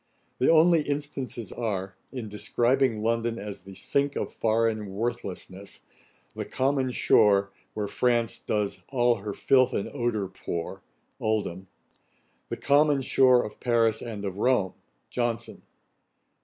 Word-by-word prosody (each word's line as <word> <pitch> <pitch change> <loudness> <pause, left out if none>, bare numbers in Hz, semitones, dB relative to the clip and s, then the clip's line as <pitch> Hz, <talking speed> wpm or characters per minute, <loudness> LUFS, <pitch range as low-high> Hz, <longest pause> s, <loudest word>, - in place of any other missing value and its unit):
The 130 - +3
only 165 0 +6
instances 140 -7 -4
are, 100 -5 -3 0.2
in 125 -5 -5
describing 120 +3 +1
London 115 0 0
as 105 -2 -6
the 95 +1 -12
sink 140 +9 0
of - - -3
foreign 110 -3 0
worthlessness: 100 -3 -4 0.3
' - - -33
the - - -3
common 135 0 0
shore, 100 -5 +4 0.2
Where 105 -1 -2
France 120 0 +1
does 105 -2 -2
all 120 -3 +2
her 100 0 -6
filth 130 -2 +3
and 100 - -1
ordure 120 -7 -1
pour.' 90 0 -5 0.4
OLDHAM. 100 -4 -2 0.8
'The - - -3
common 145 -1 +3
shore 130 -1 +5
of 105 - -9
Paris 115 -3 +2
and 105 -4 -6
of 95 0 -4
Rome.' 115 -6 +2 0.4
JOHNSON. 120 -1 -2
115 Hz, 130 wpm, -27 LUFS, 100-130 Hz, 0.8 s, only